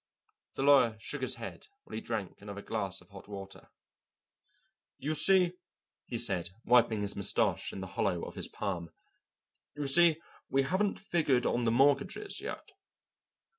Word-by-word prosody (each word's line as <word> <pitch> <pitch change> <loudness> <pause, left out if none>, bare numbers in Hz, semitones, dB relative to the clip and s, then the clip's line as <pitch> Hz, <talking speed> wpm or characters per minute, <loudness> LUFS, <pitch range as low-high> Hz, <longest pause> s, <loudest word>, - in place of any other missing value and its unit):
The - - -1
lawyer 130 -6 +5
shook 145 +5 -5
his 130 - -1
head 115 0 -8 0.2
while - - -14
he 110 - -3
drank 110 -6 -4
another 100 0 -8
glass 100 -4 -2
of - - -20
hot 100 -1 -12
water: 100 -1 -9 1.3
"You 150 +4 -2
see," 180 +2 +4 0.5
he - - -3
said, 85 -3 +1 0.2
wiping 115 -3 +4
his 100 - -2
moustache 100 - +1
in 95 - -7
the - - -4
hollow 95 -4 0
of - - -6
his - - -5
palm, 90 -5 -4 0.9
"you 145 -1 -3
see, 160 +3 +5 0.3
we 135 0 +3
haven't 190 +7 0
figured 150 -10 +1
on 120 0 +1
the 115 - +3
mortgages 140 - +2
yet." - - -7
120 Hz, 155 wpm, -31 LUFS, 100-145 Hz, 1.3 s, lawyer